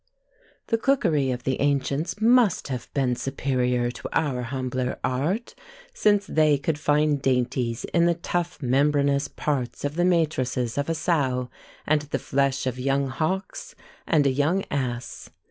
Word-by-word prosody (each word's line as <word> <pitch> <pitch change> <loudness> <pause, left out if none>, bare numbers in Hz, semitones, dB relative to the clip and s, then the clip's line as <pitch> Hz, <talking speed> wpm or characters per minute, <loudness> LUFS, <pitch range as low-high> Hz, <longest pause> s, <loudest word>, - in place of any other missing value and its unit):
The 230 - +1
cookery 170 - +2
of 125 -1 -3
the 130 0 -1
ancients 145 +6 0
must 230 - +3
have 125 -3 -5
been 130 -3 +1
superior 125 -2 -1
to - - -8
our 140 -6 0
humbler 130 0 -3
art, 155 - -1 0.4
since 205 - +2
they 155 -4 +3
could 145 +2 -2
find 150 -1 +2
dainties 125 -2 0
in 170 0 +4
the 170 - +2
tough 175 -1 -3
membranous 140 +2 +2
parts 140 -3 -3
of 145 - -2
the 175 - +2
matrices 130 -9 0
of 140 - -2
a 165 - 0
sow, 135 -7 0 0.3
and 155 0 +2
the 145 0 -3
flesh 140 0 0
of 130 -1 -2
young 135 +1 0
hawks, 160 +8 -3 0.3
and 150 -3 +3
a 135 - +4
young 150 +8 +1
ass. 125 -3 -4
140 Hz, 150 wpm, -25 LUFS, 130-160 Hz, 0.4 s, in